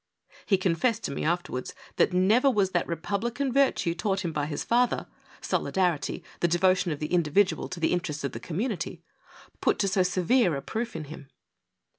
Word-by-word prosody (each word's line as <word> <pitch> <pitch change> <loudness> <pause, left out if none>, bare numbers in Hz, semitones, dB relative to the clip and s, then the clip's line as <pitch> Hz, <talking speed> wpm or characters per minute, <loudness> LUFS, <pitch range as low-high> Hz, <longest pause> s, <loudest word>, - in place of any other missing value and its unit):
He 195 - +4
confessed 205 +6 0
to - - -2
me 140 - -3
afterwards 165 -6 -2 0.2
that - - +4
never 210 +9 +4
was 200 -6 +1
that 175 - 0
republican 230 - -2
virtue 270 -11 +2
taught 190 +2 -1
him 170 - -1
by 150 -2 -2
his 150 - -3
father 240 +1 +1 0.2
— - - -24
solidarity, 180 -6 0 0.2
the 175 - +2
devotion 180 +1 +2
of 150 - -2
the 150 +3 -4
individual 180 +4 +2
to 185 - -6
the 160 - +1
interests 170 -4 -2
of 140 - -2
the 115 - -6
community 180 - -3 0.3
— - - -23
put - - +2
to 200 - +1
so 190 0 +2
severe 185 - +2
a 140 - -4
proof 230 -1 -4
in 160 - -4
him. 145 -1 -10
180 Hz, 190 wpm, -27 LUFS, 165-210 Hz, 0.3 s, He